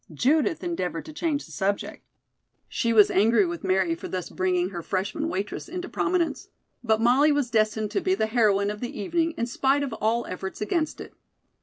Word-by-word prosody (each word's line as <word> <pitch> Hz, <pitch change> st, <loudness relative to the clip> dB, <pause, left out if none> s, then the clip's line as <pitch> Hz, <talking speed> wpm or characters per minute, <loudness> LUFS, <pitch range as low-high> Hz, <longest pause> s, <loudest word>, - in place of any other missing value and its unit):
Judith 305 Hz, -, +1 dB
endeavored 180 Hz, -, -3 dB
to 310 Hz, -, -9 dB
change 300 Hz, -1 st, -1 dB
the -, -, -15 dB
subject. 200 Hz, 0 st, -2 dB, 0.6 s
She 235 Hz, -, -1 dB
was 215 Hz, -3 st, +6 dB
angry 215 Hz, +1 st, +4 dB
with 170 Hz, -1 st, -5 dB
Mary 185 Hz, -3 st, +2 dB
for 165 Hz, -, -7 dB
thus 185 Hz, -2 st, -5 dB
bringing 180 Hz, 0 st, 0 dB
her 175 Hz, -2 st, -5 dB
freshman 205 Hz, -, -2 dB
waitress 205 Hz, -, -4 dB
into 360 Hz, +1 st, -5 dB
prominence. 350 Hz, -6 st, -1 dB, 0.4 s
But 220 Hz, -2 st, +2 dB
Molly 265 Hz, +6 st, +5 dB
was 285 Hz, -4 st, 0 dB
destined 215 Hz, -1 st, +1 dB
to 395 Hz, -, 0 dB
be 375 Hz, +1 st, +1 dB
the 220 Hz, -, +1 dB
heroine 210 Hz, -3 st, +2 dB
of 210 Hz, -, -7 dB
the 245 Hz, +3 st, -5 dB
evening 330 Hz, -, 0 dB
in 235 Hz, -, 0 dB
spite 270 Hz, +4 st, +1 dB
of 270 Hz, -5 st, -4 dB
all 225 Hz, +2 st, 0 dB
efforts 190 Hz, +1 st, -6 dB
against 310 Hz, +9 st, -1 dB
it. -, -, -10 dB
225 Hz, 190 wpm, -25 LUFS, 195-295 Hz, 0.6 s, was